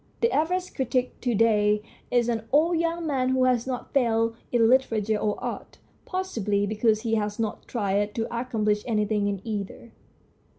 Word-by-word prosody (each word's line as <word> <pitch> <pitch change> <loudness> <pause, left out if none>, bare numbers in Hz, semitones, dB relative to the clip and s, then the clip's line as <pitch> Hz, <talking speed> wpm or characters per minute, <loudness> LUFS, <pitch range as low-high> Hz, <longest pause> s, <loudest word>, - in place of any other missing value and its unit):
The 465 - +3
average 360 +4 0
critic 255 -1 -1
to 245 -2 0
day 210 -1 +3 0.3
is 240 -1 +2
an 225 -2 -2
old 325 +4 +3
young 335 0 -1
man 265 -4 0
who 260 0 +2
has 250 -1 +2
not 255 -2 -5
failed 230 -4 +2 0.2
in 230 -2 +4
literature 225 -4 +2
or 210 0 -1
art, - - -5 0.3
possibly 220 - -1
because 215 +1 +1
he 225 -1 -2
has 210 -1 0
not 220 -2 -3
tried 205 -2 -1
to 225 - -1
accomplish 215 -4 0
anything 210 -2 +1
in 200 -2 -2
either. 215 +1 -5
230 Hz, 165 wpm, -26 LUFS, 210-255 Hz, 0.3 s, in